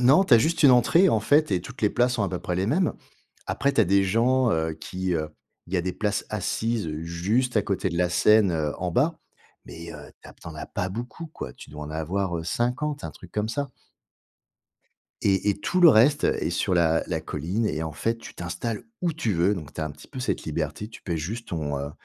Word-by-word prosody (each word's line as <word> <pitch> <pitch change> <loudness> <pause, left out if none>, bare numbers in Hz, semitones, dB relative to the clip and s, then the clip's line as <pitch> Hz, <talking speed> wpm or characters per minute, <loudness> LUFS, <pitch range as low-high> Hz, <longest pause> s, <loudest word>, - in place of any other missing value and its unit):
non, 135 +10 +6
tu 130 - +6
as - - +8
juste 160 +7 +1
une 140 - +8
entrée 165 +9 +5
en 110 - +2
fait 145 +6 +3
et 90 -3 +1
toutes 125 +5 -11
les 105 - +4
places 125 0 +2
sont 110 - 0
à 100 - 0
peu 90 -1 -3
près 90 - -3
les 95 - 0
mêmes. 165 - +1 0.5
Après 140 - 0
tu 130 - +3
as 110 - +5
des 100 +2 +3
gens 120 +5 +3
heu, 80 0 0
qui, 90 +3 -3
heu, 75 -1 -1 0.4
il 90 - -6
y - - +4
a 85 - +1
des 90 0 -2
places 105 -1 -1
assises 110 -1 -1
juste 105 +9 0
à 105 - +4
côté 100 0 -1
de 85 -1 -3
la 90 0 +3
scène 105 +1 +4
heu, 75 -2 -1
en 90 -1 -2
bas, 155 - +2 0.5
mais 85 0 -9
heu, 75 -1 -11
tu - - -12
as - - -12
tu - - -17
en - - -7
as - - -6
pas 90 - -3
beaucoup 120 - -6
quoi. 65 - -8
Tu - - -13
dois 75 0 -8
en 75 - -8
avoir 85 +3 -2
heu, 80 - -5
50, 125 - -1
un - - -4
truc - - -15
comme 105 0 -1
ça. 140 +4 -3 1.5
Et 100 +1 +2
et - - 0
tout 180 - 0
le 170 -3 +9
reste, 135 +6 +5
heu, - - +3
est - - 0
sur - - 0
la 80 -2 +3
la - - -2
colline 90 +10 -2
et 80 -5 -2
en 80 -1 -4
fait, 115 +9 -1
tu 115 - -11
t'installes 90 +6 -4 0.2
où 170 -2 +1
tu 120 -9 -1
veux. 90 +5 +3
Donc, 75 -7 -8
tu - - -5
as - - 0
un 75 - -4
petit - - -14
peu 135 - -9
cette 125 - -2
liberté, 80 +5 -3
tu 115 - -13
paies 85 -3 -2
juste 110 +9 -5
ton 75 -4 -2
heu, 70 +1 -4
100 Hz, 255 wpm, -25 LUFS, 85-125 Hz, 1.5 s, le